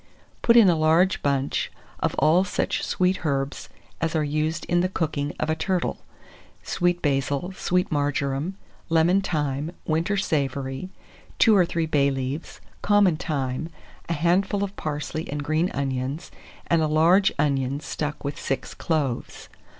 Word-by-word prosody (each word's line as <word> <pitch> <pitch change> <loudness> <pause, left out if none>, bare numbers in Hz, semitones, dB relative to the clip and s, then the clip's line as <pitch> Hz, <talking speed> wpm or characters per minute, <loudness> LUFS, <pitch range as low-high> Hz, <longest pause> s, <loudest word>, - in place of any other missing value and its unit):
Put 235 0 +5
in 225 -4 +8
a 175 - +5
large 160 +4 +3
bunch 140 -1 0 0.3
of - - -1
all 170 +4 +4
such 190 - -1
sweet 185 0 0
herbs 140 -2 -2 0.3
as 165 0 -1
are 155 - +2
used 155 +3 -1
in 175 - +1
the 185 - +1
cooking 150 -5 -2
of - - 0
a 160 - +1
turtle, 180 +2 -1 0.6
sweet 175 0 0
basil, 140 +4 0
sweet 180 -1 0
marjoram, 145 +4 -1 0.3
lemon 165 +4 +4
thyme, 150 -4 -2
winter 165 +6 0
savory, 140 -2 -2 0.5
2 220 -3 +6
or 180 -3 +4
3 170 -2 -1
bay 145 -3 +2
leaves, 135 +3 -4 0.2
common 205 -4 +4
thyme, 150 -2 -3 0.4
a - - +1
handful 185 +5 +1
of 200 0 -4
parsley 155 +1 -4
and 145 0 -3
green 155 +4 +1
onions, 135 +2 -3 0.3
and 170 -1 +2
a 155 - +2
large 170 +6 +4
onion 140 -2 0
stuck 150 0 -4
with 140 0 -4
6 135 - -3
cloves. 145 -7 -2
155 Hz, 150 wpm, -25 LUFS, 140-175 Hz, 0.6 s, in